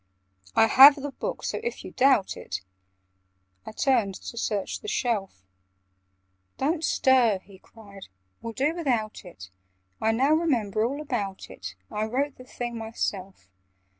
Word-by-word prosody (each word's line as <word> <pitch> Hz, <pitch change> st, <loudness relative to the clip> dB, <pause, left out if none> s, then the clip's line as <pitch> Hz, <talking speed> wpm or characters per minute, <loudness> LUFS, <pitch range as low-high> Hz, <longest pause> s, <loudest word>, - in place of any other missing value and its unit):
"I 225 Hz, -, +6 dB
have 275 Hz, +5 st, +9 dB
the 285 Hz, -1 st, -6 dB
book; -, -, -5 dB
so -, -, -2 dB
if 475 Hz, +1 st, -5 dB
you -, -, -8 dB
doubt 255 Hz, -7 st, +3 dB
it—" 95 Hz, -, -6 dB, 1.1 s
I -, -, -5 dB
turned 225 Hz, -5 st, +1 dB
to -, -, -9 dB
search 210 Hz, -4 st, -2 dB
the -, -, -10 dB
shelf. 200 Hz, -, -2 dB, 1.1 s
"Don't 315 Hz, +4 st, 0 dB
stir!" 255 Hz, -8 st, +3 dB
he 195 Hz, -2 st, -16 dB
cried. 200 Hz, -3 st, -14 dB, 0.3 s
"We'll 230 Hz, 0 st, -6 dB
do 285 Hz, +7 st, 0 dB
without 245 Hz, -11 st, -2 dB
it: 95 Hz, -, -12 dB, 0.5 s
I 220 Hz, -, +3 dB
now 260 Hz, +6 st, +2 dB
remember 235 Hz, -, +1 dB
all 275 Hz, +6 st, -2 dB
about 205 Hz, -10 st, -4 dB
it; 90 Hz, 0 st, -8 dB, 0.2 s
I 210 Hz, +1 st, -1 dB
wrote 265 Hz, +5 st, -2 dB
the 255 Hz, -, -12 dB
thing 240 Hz, -2 st, -5 dB
myself. 195 Hz, -, -4 dB
230 Hz, 145 wpm, -26 LUFS, 200-275 Hz, 1.1 s, have